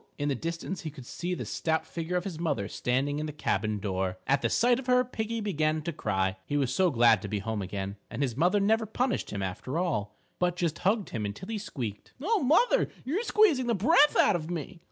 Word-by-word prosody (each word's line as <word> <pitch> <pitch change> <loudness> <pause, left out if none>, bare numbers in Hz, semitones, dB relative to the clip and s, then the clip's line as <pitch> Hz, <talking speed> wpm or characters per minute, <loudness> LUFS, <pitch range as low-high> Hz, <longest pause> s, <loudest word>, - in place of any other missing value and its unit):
In 145 0 -1
the - - +2
distance 165 +6 -4
he 160 - -4
could 135 -4 -11
see 175 +8 -3
the - - -5
stout 160 -1 -1
figure 170 +1 -4
of 180 - -1
his 180 -5 -5
mother 135 -12 -1
standing 135 +6 -1
in 155 - -2
the - - -4
cabin 110 -7 -1
door. 95 -2 -2
At 140 +1 +2
the - - +1
sight 245 +1 +3
of 265 - -8
her 250 0 +5
Piggie 225 -1 -3
began 155 -6 0
to 170 +1 -3
cry, 95 -7 -1
he 145 - -2
was 135 -3 +1
so 185 +4 +3
glad 115 - +5
to 100 - -5
be 105 +1 -2
home 110 +1 -3
again. 95 +1 -4
And 145 - -2
his 125 -4 -1
mother 180 +8 +3
never 220 +2 +2
punished 245 +3 -1
him 100 -2 -3
after 95 - -4
all, 105 - -1 0.2
but 180 -1 +1
just 170 -3 -1
hugged 200 +2 +1
him 110 - -3
until 105 - -5
he 220 -2 -2
squeaked, 120 - -6
"Oh, 405 - +1
mother, 345 - +4 0.2
you're 320 - 0
squeezing 400 - +3
the 235 - +2
breath 290 - +5
out - - +5
of 160 -1 -4
me!" 175 +1 -5
160 Hz, 235 wpm, -29 LUFS, -, 0.2 s, her